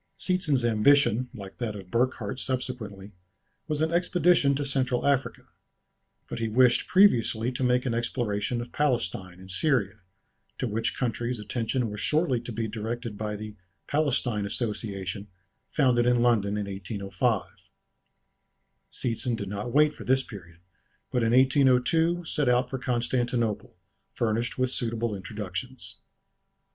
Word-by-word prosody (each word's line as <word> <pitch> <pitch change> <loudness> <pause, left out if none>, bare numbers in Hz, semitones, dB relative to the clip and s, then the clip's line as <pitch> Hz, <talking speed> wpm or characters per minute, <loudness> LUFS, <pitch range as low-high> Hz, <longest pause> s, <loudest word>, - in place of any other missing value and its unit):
Seetzen's 150 -9 +1
ambition, 125 +1 +4
like 100 -6 -10
that 115 -4 -3
of 95 -2 -10
Burckhardt 120 -2 0
subsequently, 115 -7 -4 0.6
was 150 -1 -1
an 160 +1 +1
expedition 175 -4 +3
to 145 +1 -2
Central 130 -2 0
Africa, 140 -2 +1 0.8
but - - -5
he 115 - 0
wished 120 +2 +4
previously 125 - +4
to 130 +1 -3
make 125 +1 +2
an 125 - 0
exploration 115 -1 -1
of 120 0 -8
Palestine 95 -10 -1
and 95 0 -10
Syria, 110 -2 0 0.6
to - - -2
which 115 0 -2
countries 120 -1 -2
attention 120 +3 -1
was 105 - -6
shortly 150 -6 +1
to 120 - -7
be 115 0 -2
directed 115 +1 -4
by 105 0 -3
the 105 0 -7 0.3
"Palestine 130 -7 0
Association," 100 -3 -3 0.4
founded 125 -4 +3
in 120 -1 +3
London 105 -4 +2
in 105 - -2
1805. 100 +2 -3 1.2
Seetzen 120 0 -2
did 100 -3 -5
not 105 +4 -4
wait 150 +2 +4
for - - -10
this 130 +1 +2
period, 85 -7 -12 0.5
but 125 - +1
in 115 0 +2
1802 135 +6 +3
set 150 -4 0
out 125 +1 +2
for 130 - -3
Constantinople, 120 -2 -1 0.4
furnished 115 +1 -1
with 130 0 +1
suitable 115 -2 -2
introductions. 105 +5 -6
120 Hz, 135 wpm, -27 LUFS, 105-130 Hz, 1.2 s, ambition